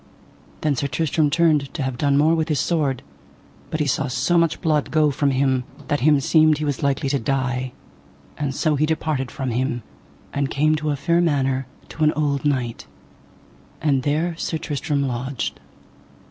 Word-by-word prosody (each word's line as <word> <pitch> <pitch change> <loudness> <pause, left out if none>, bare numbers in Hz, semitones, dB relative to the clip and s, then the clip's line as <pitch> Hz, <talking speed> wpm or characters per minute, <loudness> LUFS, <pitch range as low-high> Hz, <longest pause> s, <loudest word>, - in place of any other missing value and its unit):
Then 150 -2 +1
Sir 140 +3 -1
Tristram 155 +1 +1
turned 155 -3 +2
to 150 - -2
have 130 -1 -2
done 140 +2 +2
more 155 +3 +4
with 160 0 0
his 150 -3 +1
sword, 145 -7 0 0.7
but 155 - -3
he 150 - +1
saw 145 +1 0
so 135 +7 0
much 170 -2 +2
blood 155 -4 +1
go 155 -2 +3
from 140 +1 +1
him 130 -1 +1 0.3
that 145 - +1
him 145 +1 +4
seemed 155 +2 +4
he 155 - -2
was 145 -3 -2
likely 140 0 0
to 140 0 +1
die, 130 0 -1 0.6
and 140 -2 -3
so 155 0 +1
he 150 +2 +1
departed 155 -4 -1
from 130 -2 -4
him 120 0 -1 0.5
and 140 -1 0
came 155 +2 +2
to 155 0 -2
a 145 - +1
fair 170 +5 +1
manor 135 -5 +1 0.2
to 160 - -3
an 155 - +4
old 145 -2 -1
knight, 130 -5 -1 0.9
and 140 -4 +1
there 155 +5 0
Sir 165 - -2
Tristram 145 -2 -2
lodged. 125 +1 -3
145 Hz, 180 wpm, -22 LUFS, 135-155 Hz, 0.9 s, more